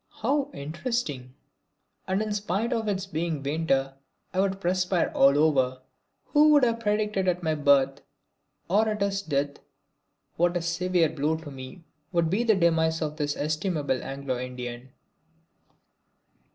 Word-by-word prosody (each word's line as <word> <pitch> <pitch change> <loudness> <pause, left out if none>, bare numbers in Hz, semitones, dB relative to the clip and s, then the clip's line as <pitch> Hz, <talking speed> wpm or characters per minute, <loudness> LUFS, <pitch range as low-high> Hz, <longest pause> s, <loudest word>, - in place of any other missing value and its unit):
"How 280 +3 +1
interesting!" 150 - -4 0.7
And 190 +3 +1
in 215 -1 -3
spite 210 +3 -1
of 225 -2 -1
its 195 -2 -1
being 165 -5 -3
winter 140 -2 0 0.4
I 185 - -1
would 195 0 +1
perspire 180 -1 +1
all 140 +1 +5
over. 130 -4 +2 0.5
Who 300 0 +5
would 290 -2 +5
have 230 -1 +2
predicted 210 -3 0
at 180 0 0
my 160 -1 +1
birth 140 -2 +3 0.7
or 215 +5 +3
at 210 -1 -3
his 200 0 -1
death 145 -5 -2 0.8
what 175 +1 +2
a - - -2
severe 170 -1 +1
blow 155 +1 -1
to 160 -2 -10
me 135 +6 -10 0.3
would 170 -2 +1
be 210 +5 +1
the 225 -3 +4
demise 160 -2 +2
of 150 0 -4
this 145 -1 -2
estimable 155 -3 -1
Anglo 135 -2 -4
Indian! 125 0 -6
165 Hz, 145 wpm, -27 LUFS, 140-195 Hz, 0.8 s, all